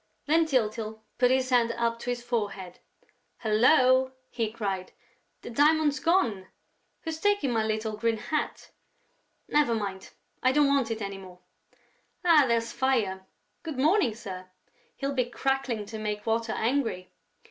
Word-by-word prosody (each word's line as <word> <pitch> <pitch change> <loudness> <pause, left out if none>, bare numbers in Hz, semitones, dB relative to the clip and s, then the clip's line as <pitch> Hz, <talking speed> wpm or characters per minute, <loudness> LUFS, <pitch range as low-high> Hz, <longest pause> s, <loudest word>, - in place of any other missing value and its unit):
Then 320 +2 +3
Tyltyl 220 -5 -1 0.2
put 250 0 +5
his 260 0 +1
hand 235 -2 +3
up 230 0 -1
to 245 - -5
his 240 -1 -2
forehead: 205 -6 -3 0.6
"Hullo!" 255 +3 +4 0.2
he 225 -3 -2
cried. 195 -5 -4 0.5
"The - - -7
diamond's 295 +2 +3
gone!... 230 - +1 0.5
Who's 320 -1 -5
taken 410 -8 +1
my 225 -2 +1
little 220 0 -2
green 225 +1 0
hat?... 305 +8 -3 0.8
Never 290 -6 +2
mind, 195 -3 -4 0.3
I 255 +1 +3
don't 295 +1 +4
want 280 -4 +2
it 225 -1 -3
any 195 -1 -5
more!... 185 -2 -12 0.9
Ah, 320 -5 +6
there's 230 0 0
Fire! 215 -9 0 0.3
Good 315 -5 -6
morning, 300 - +3
sir! 185 -5 -8 0.5
He'll 275 0 -3
be 255 -2 +1
crackling 255 -3 -1
to 220 +1 -7
make 210 -1 -3
Water 225 0 0
angry!" 230 -7 -1
235 Hz, 145 wpm, -28 LUFS, 215-270 Hz, 0.9 s, Ah